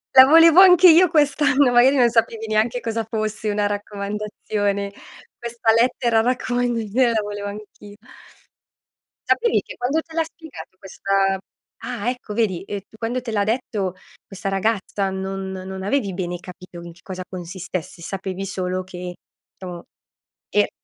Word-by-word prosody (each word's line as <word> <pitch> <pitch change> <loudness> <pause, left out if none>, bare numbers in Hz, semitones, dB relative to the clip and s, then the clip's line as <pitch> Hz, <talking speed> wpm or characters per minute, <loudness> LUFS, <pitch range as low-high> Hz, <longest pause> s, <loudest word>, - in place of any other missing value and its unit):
"La 260 - +11
volevo 330 +4 +7
anche 360 -1 +8
io 340 +2 +6
quest'anno!" 285 -3 +3
Magari 250 +3 +5
non 245 -3 +4
sapevi 225 -1 0
neanche 220 +3 +1
cosa 225 -1 -3
fosse 215 -1 -3
una 205 0 0
raccomandazione. 205 0 -3 0.5
"Questa 235 -1 -3
lettera 235 -1 +2
raccomandazione 245 -1 0
la 220 -2 +1
volevo 205 0 -5
anch'i" 205 0 -11 1.3
Sapevi 465 -1 +2
che - - -11
quando 275 +6 0
te 325 - -17
l'ha 325 0 +1
spiegato 320 - -12
questa 195 0 0 0.4
ah, 240 -2 -3
ecco, 250 -4 -6
vedi, 205 -6 0
ehm, 205 - -4
tu 220 - -19
quando 240 +3 -2
te 235 -2 -6
l'ha 205 -2 +1
detto 210 -5 -2 0.3
questa 195 0 -5
ragazza 195 0 -1
non 190 0 -4
non 190 0 -7
avevi 205 -2 -1
bene 175 -1 -3
capito 180 -1 -11
in 170 -1 -10
che 170 - -22
cosa 185 -1 -6
consistesse, 180 -1 -7
sapevi 190 +2 -5
solo 185 -1 -3
che 180 -1 -8 0.4
diciamo, 180 -2 -8 0.7
e - - +2
210 Hz, 145 wpm, -21 LUFS, 190-245 Hz, 1.3 s, La